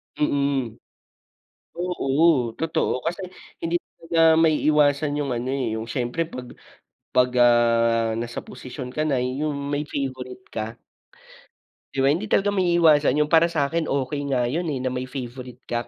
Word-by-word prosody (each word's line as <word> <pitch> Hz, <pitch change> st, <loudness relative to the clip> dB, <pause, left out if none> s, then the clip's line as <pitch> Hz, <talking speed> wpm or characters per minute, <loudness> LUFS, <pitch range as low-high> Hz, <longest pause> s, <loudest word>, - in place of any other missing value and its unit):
Mm. 140 Hz, -5 st, 0 dB, 1.0 s
Oo 160 Hz, -6 st, +2 dB
totoo 160 Hz, 0 st, 0 dB
kasi 175 Hz, +3 st, -2 dB, 0.4 s
hindi 165 Hz, +1 st, -1 dB, 0.2 s
talaga 165 Hz, 0 st, -2 dB, 0.2 s
maiiwasan 150 Hz, -2 st, +2 dB
yung 140 Hz, -3 st, -2 dB
ano, 120 Hz, +1 st, -3 dB
eh, 135 Hz, -2 st, -1 dB
yung 110 Hz, +1 st, -5 dB
syempre 120 Hz, +6 st, -2 dB
'pag 125 Hz, -5 st, -8 dB, 0.7 s
'pag, 125 Hz, 0 st, +4 dB
ah, 115 Hz, -1 st, +4 dB
nasa 120 Hz, 0 st, -4 dB
posisyon 125 Hz, 0 st, -8 dB
ka 155 Hz, -, -1 dB
na 140 Hz, -, +1 dB
yung 140 Hz, +4 st, -2 dB, 0.2 s
may 145 Hz, +1 st, 0 dB
favorite 130 Hz, -2 st, -5 dB
ka. 110 Hz, +1 st, -4 dB, 1.2 s
Di 135 Hz, -, 0 dB
ba 135 Hz, -, +5 dB
hindi 180 Hz, +8 st, -1 dB
talaga 205 Hz, 0 st, +2 dB
maiiwasan 170 Hz, -7 st, +4 dB
yung 150 Hz, +1 st, +1 dB
para 165 Hz, +1 st, +6 dB
sakin 160 Hz, 0 st, -1 dB
okay 140 Hz, +1 st, -1 dB
nga 130 Hz, -3 st, +1 dB
yun, 165 Hz, +8 st, -1 dB
eh, 140 Hz, -4 st, -2 dB
na 130 Hz, -, -1 dB
may 130 Hz, 0 st, -4 dB
favorite 125 Hz, -1 st, -8 dB
ka, 120 Hz, -1 st, -3 dB
140 Hz, 145 wpm, -24 LUFS, 125-155 Hz, 1.2 s, para